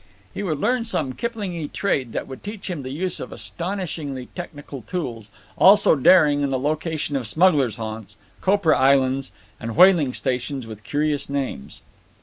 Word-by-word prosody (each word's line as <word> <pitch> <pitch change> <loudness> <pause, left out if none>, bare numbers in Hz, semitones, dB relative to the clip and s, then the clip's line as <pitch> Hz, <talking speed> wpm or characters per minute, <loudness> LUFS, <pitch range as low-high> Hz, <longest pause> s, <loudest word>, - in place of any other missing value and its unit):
He - - -5
would 170 -7 -2
learn 245 - +1
some 155 - -2
Kiplingy 195 - -4
trade 135 - -1
that - - -3
would 130 - -10
teach 205 -2 -6
him 165 -5 -4
the 130 - -7
use 175 +7 -1
of - - -7
astonishingly 165 -8 -5
technical 145 -6 -8
tools, 115 - -5 0.3
also 200 -3 +7
daring 150 0 +5
and 140 - 0
the 130 - +1
location 155 +1 -2
of 130 -4 -2
smugglers' 145 - +3
haunts, 110 -1 -7 0.2
copra 190 -5 +3
islands, 135 0 +2 0.3
and 115 0 -5
whaling 175 -7 +5
stations 130 +1 -3
with 110 -1 -10
curious 145 +2 -1
names. 135 - -4
145 Hz, 155 wpm, -22 LUFS, 130-180 Hz, 0.3 s, also